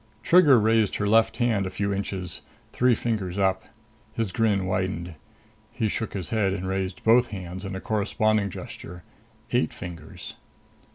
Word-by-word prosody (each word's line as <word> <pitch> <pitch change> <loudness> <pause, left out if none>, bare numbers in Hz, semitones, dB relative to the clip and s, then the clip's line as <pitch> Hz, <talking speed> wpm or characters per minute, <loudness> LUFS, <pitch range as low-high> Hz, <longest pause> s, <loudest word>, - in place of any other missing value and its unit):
Trigger 155 -8 +6
raised 110 -1 +2
her 105 - -1
left 110 +2 +3
hand 115 -6 +1
a - - -3
few 100 +2 -2
inches, 95 -2 -4 0.3
three 125 -1 +3
fingers 105 -6 -2
up. 95 -1 +1 0.5
His 115 -4 -1
grin 100 -2 +1
widened. 95 -2 -2 0.6
He 110 - -1
shook 110 0 -3
his 90 -5 -4
head 105 -4 +1
and 95 -1 -4
raised 95 -1 -3
both 120 +2 +5
hands 95 -2 -7
in 95 0 -5
a - - -4
corresponding 110 0 +1
gesture. 90 -1 -9 0.5
Eight - - +2
fingers. 90 -1 -8
100 Hz, 155 wpm, -25 LUFS, 95-110 Hz, 0.6 s, Trigger